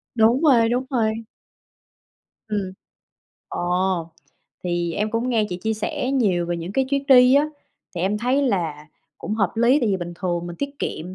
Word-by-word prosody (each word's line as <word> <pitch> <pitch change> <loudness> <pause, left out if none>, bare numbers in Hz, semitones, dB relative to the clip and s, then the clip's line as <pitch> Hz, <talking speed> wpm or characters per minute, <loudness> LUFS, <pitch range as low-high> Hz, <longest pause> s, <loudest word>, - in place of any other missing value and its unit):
Đúng 230 +3 +4
rồi, 245 -7 +5
đúng 245 +2 0
rồi. 225 -3 0 1.2
Ừm. 200 -3 -2 0.8
Ồ! 180 -1 -1 0.5
Thì 175 -1 -1
em 210 +1 -1
cũng 230 +3 -1
nghe 225 -3 +2
chị 180 - -4
chia 220 +5 -2
sẻ 220 +4 -3
nhiều 200 -10 +1
về 175 0 -2
những 170 +3 -6 0.2
chuyến 280 0 0
đi 250 -1 +7
á. 285 +2 +4 0.5
Thì 175 - -3
em 195 +4 0
thấy 255 +5 +1
là 165 - -1 0.3
cũng 210 - -4
hợp 200 -4 0
lý 240 +6 +4
tại 235 - +1
vì 195 - +1
bình 175 -1 -6
thường 175 -1 -2
mình 175 0 -7
tiết 280 +7 -3
kiệm, 175 +4 -4
210 Hz, 180 wpm, -22 LUFS, 175-245 Hz, 1.2 s, đi